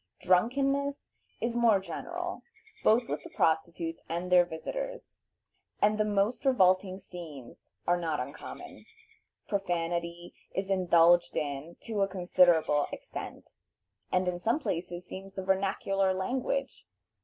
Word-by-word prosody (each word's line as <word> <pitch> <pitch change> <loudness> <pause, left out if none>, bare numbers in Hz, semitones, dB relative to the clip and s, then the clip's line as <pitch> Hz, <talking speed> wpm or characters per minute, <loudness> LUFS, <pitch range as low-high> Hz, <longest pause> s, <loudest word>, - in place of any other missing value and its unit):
Drunkenness 275 +9 +1 0.3
is 235 +1 -1
more 230 -4 +5
general, 345 - -5 0.4
both 230 +2 +4
with 145 +1 -3
the - - -9
prostitutes 165 +1 0
and 175 +2 -3
their 180 -1 +7
visitors, - - -6 0.6
and 210 +1 +3
the - - +4
most 205 +3 +1
revolting 185 -7 +3
scenes 160 -10 -11
are 175 - +3
not 160 -3 -1
uncommon. 125 - -8 0.6
Profanity 175 -2 -2 0.2
is 190 0 -2
indulged 175 -2 +4
in 145 +3 -3
to 220 -3 -2
a 195 - +3
considerable 175 -5 +3
extent, - - -8 0.6
and 185 0 +2
in 175 -1 -1
some 230 +8 +1
places 175 - -4
seems 195 +1 -9
the 190 - -4
vernacular 195 0 +1
language. 260 +7 -2
185 Hz, 120 wpm, -30 LUFS, 170-215 Hz, 0.6 s, their